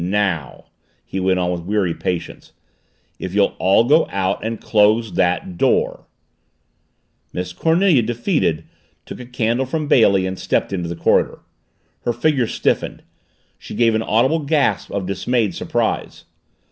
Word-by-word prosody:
Now 95 -5 -1 0.2
" - - -42
he 95 - -4
went 95 0 +1
on 90 -1 0
with 90 -1 -3
weary 95 -1 0
patience, 90 0 -5 0.7
"if 95 +1 -5
you'll 100 -1 +2
all 95 +4 +4
go 150 +7 +4
out 95 0 -1
and 115 0 -3
close 110 +1 +2
that 90 -1 0
door - - +1 0.6
" - - -47
Miss 90 0 -4
Cornelia, 165 - +3
defeated, 115 - -1 0.4
took - - -9
a 125 - -9
candle 120 +1 -1
from 155 +2 -2
Bailey 100 -8 +4
and 95 0 -4
stepped - - -1
into 90 -3 -3
the 85 - -4
corridor. - - +1 0.6
Her 120 - -2
figure 130 0 +1
stiffened. - - -1 0.6
She - - -9
gave 115 0 +3
an 110 - +1
audible 120 +9 +2
gasp 150 -1 0
of 100 -2 -3
dismayed 105 +2 -1
surprise. - - -2
105 Hz, 150 wpm, -20 LUFS, 95-125 Hz, 0.7 s, all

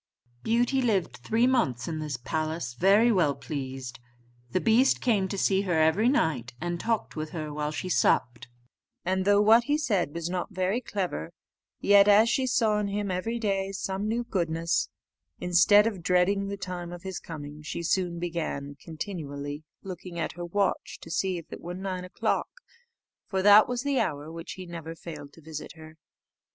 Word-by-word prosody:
Beauty 245 +4 +2
lived 210 -8 0
three 220 - +1
months 140 - +1
in 160 -1 -3
this 150 -4 -3
palace 155 +1 -3
very 200 - +4
well 165 -9 +2
pleased. 130 -2 -6 0.5
The 185 - 0
beast 230 +6 +4
came 210 -6 +2
to 200 - -4
see 195 0 +2
her 180 -5 0
every 160 +9 +4
night, 130 - 0
and 175 0 -3
talked 225 +2 -1
with 155 0 -4
her 155 -3 -4
while 150 0 -2
she 155 +4 -4
supped; 125 -8 +1 0.6
and 185 +1 0
though 205 +1 +5
what 225 +3 +6
he 295 +1 +2
said 200 - 0
was 170 -1 -3
not 180 0 -3
very 185 +6 0
clever, 185 - -3 0.5
yet, 200 0 +6
as 210 +3 +6
she 260 +2 +1
saw 225 -4 +2
in 205 - -1
him 200 0 -2
every 205 +6 -2
day 195 -3 -1
some 195 +1 -3
new 235 +2 0
goodness, 170 -6 0 0.5
instead 185 +4 +5
of 210 -6 -2
dreading 180 +3 +2
the 200 0 -4
time 180 -2 -5
of 175 -1 -9
his 190 -1 -5
coming, 150 -2 -8
she 155 +2 -5
soon 175 0 0
began 165 -5 -3
continually 150 -4 -5 0.2
looking 180 -2 -7
at 165 - -2
her 175 +1 -6
watch, 195 +2 -1
to 165 - -10
see 185 +2 0
if 165 - -9
it - - -8
were 175 +1 -6
nine 185 -1 -4
o'clock; 180 - -1 0.8
for 190 -2 -1
that 205 +1 +8
was 245 0 -2
the 280 -2 +1
hour 150 0 -2
when 165 0 -8
he 185 -1 -7
never 165 -1 -7
failed 150 -4 -9
to 165 - -17
visit 155 -1 -7
her. 160 0 -13
180 Hz, 180 wpm, -27 LUFS, 160-205 Hz, 0.8 s, that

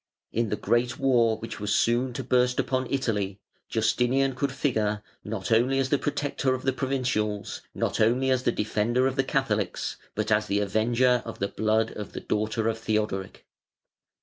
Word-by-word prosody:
In 115 -1 0
the 105 - 0
great 120 +4 0
war 120 -5 +3
which 115 +1 -7
was 105 0 0
soon 120 +2 +2
to 135 - -4
burst 125 0 +2
upon 130 -1 0
Italy 105 -7 -1 0.3
Justinian 125 +4 +2
could 140 +2 -1
figure 110 -7 0 0.2
not 100 -2 -4
only 125 +4 +3
as 135 -1 +1
the 145 - +2
protector 145 -3 0
of 130 - -7
the 135 - +1
provincials, 125 -6 -1
not - - -1
only 125 +4 +3
as 130 -1 +2
the 120 - +2
defender 115 +4 +1
of 130 0 0
the 135 - +2
Catholics, 105 -9 -1 0.2
but 110 0 -1
as 105 0 +3
the 100 0 +1
avenger 120 +4 +2
of 115 - -7
the 100 - -1
blood 110 +1 +1
of 105 -2 -7
the - - -4
daughter 110 +1 -1
of 115 0 -1
Theodoric. 105 -4 -2
115 Hz, 175 wpm, -27 LUFS, 105-130 Hz, 0.3 s, war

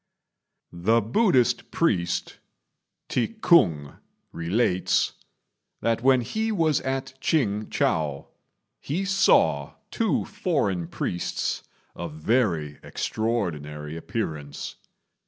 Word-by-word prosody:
The 100 +7 +3
Buddhist 125 - +2
priest, 90 - 0 0.7
T'i 220 - -1
k'ung, 85 - +3 0.3
relates 90 +3 +1 0.7
that 115 0 +1
when 130 0 +5
he 220 - -2
was 160 -7 +2
at 130 0 -3
Ch'ing 110 -9 +1
chou 75 -3 0 0.5
he 175 +8 -2
saw 195 0 +3 0.2
two 225 -2 +1
foreign 100 - -1
priests 90 - -2 0.3
of 85 -3 -6
very 80 - 0
extraordinary 80 -10 -3
appearance. 80 - -5
110 Hz, 85 wpm, -25 LUFS, 80-135 Hz, 0.7 s, when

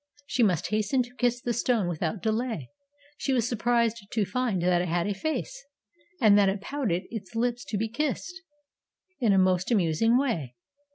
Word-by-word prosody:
She 250 - -1
must 185 -8 +2
hasten 215 +5 +1
to 245 0 -14
kiss 245 -1 0
the 240 - 0
stone 230 -4 +1
without 170 +2 -3
delay. 220 - -2 0.5
She 270 - 0
was 240 -3 +1
surprised 230 -2 0
to 215 -2 0
find 215 -1 -1
that 175 -1 +3
it 180 - -2
had 170 0 0
a 205 - 0
face, 315 - -4 0.6
and 215 -5 +6
that 200 -1 +4
it 195 +1 -2
pouted 205 -6 -2
its 205 -4 -7
lips 240 +1 0
to 210 - -3
be 220 +2 -1
kissed, 295 +9 -2 0.9
in 235 -6 +3
a 195 - +4
most 185 -1 +2
amusing 215 +2 +3
way. 170 - -1
220 Hz, 180 wpm, -27 LUFS, 185-245 Hz, 0.9 s, and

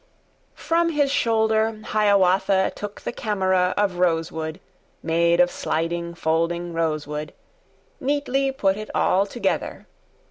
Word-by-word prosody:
] - - -40
FROM 335 +1 +1
his 290 -3 +1
shoulder 220 -3 +1
Hiawatha 195 -2 +2
Took 205 0 -7
the - - -4
camera 190 -5 0
of 195 -4 0
rosewood, 165 -2 -1 0.4
Made 170 +1 +2
of 175 0 +4
sliding, 170 +1 -2
folding 170 +1 -1
rosewood; 155 -2 -3 0.6
Neatly 275 -1 0
put 200 -7 0
it 215 0 -7
all 195 +2 +2
together. 240 - -3
190 Hz, 115 wpm, -23 LUFS, 170-220 Hz, 0.6 s, of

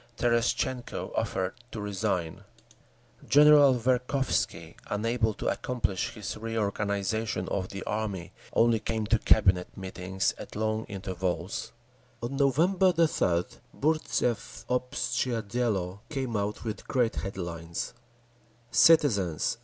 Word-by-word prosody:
Terestchenko 120 +1 0
offered 95 0 -1 0.2
to 110 - -5
resign…. 100 -5 -2 0.9
General 145 -2 +7
Verkhovsky, 125 - 0
unable 110 +1 0
to - - -6
accomplish 120 -7 -1
his 105 - -5
reorganisation 110 -1 -1
of 95 -2 -2
the 100 -1 -6
army, 100 -5 -3 0.2
only 115 -1 +4
came 110 0 -2
to 115 +1 +2
Cabinet 95 -5 +4
meetings 95 0 -2
at - - -9
long 110 +1 -1
intervals…. 95 -2 -3 0.5
On 120 +4 -3
November 170 +8 +3
3d 120 - +1 0.2
Burtzev's 145 -7 0
Obshtchee 125 -2 -1
Dielo 100 -4 -1
came 130 -5 -3
out 105 +1 -2
with 110 -3 -5
great 120 -4 +1
headlines: 85 -3 -4 0.8
Citizens! 110 - +4
110 Hz, 105 wpm, -28 LUFS, 95-125 Hz, 0.9 s, General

